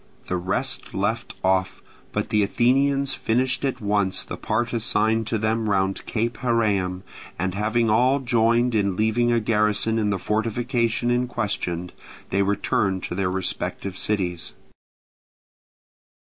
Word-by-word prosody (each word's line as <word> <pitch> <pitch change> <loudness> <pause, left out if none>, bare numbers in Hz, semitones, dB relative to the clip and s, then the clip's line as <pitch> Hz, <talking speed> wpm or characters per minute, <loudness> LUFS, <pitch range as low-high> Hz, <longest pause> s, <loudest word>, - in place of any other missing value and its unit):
The 90 - -2
rest 95 +9 -2
left 105 +4 -2
off; 95 0 +1 0.3
but - - -3
the 105 - +3
Athenians 135 +6 +2
finished 125 +4 0
at 135 -2 -1
once 100 -2 +2
the - - -6
part 120 +3 -1
assigned 110 -1 +1
to 115 - 0
them 110 0 0
round 95 -1 0
Cape 115 +1 -2
Heraeum; 100 -7 0 0.3
and 95 +1 -1
having 110 +4 +1
all 125 +5 +3
joined 120 -1 +2
in 100 -3 +1
leaving 110 +3 +2
a 120 - +3
garrison 105 0 +1
in 105 -1 +1
the 100 - 0
fortification 115 +2 0
in 125 +1 +1
question, 90 -7 -2 0.4
they 100 - +2
returned 100 -1 0
to - - -4
their 95 0 0
respective 95 +1 -3
cities. 95 -4 -1
110 Hz, 135 wpm, -24 LUFS, 100-120 Hz, 0.4 s, the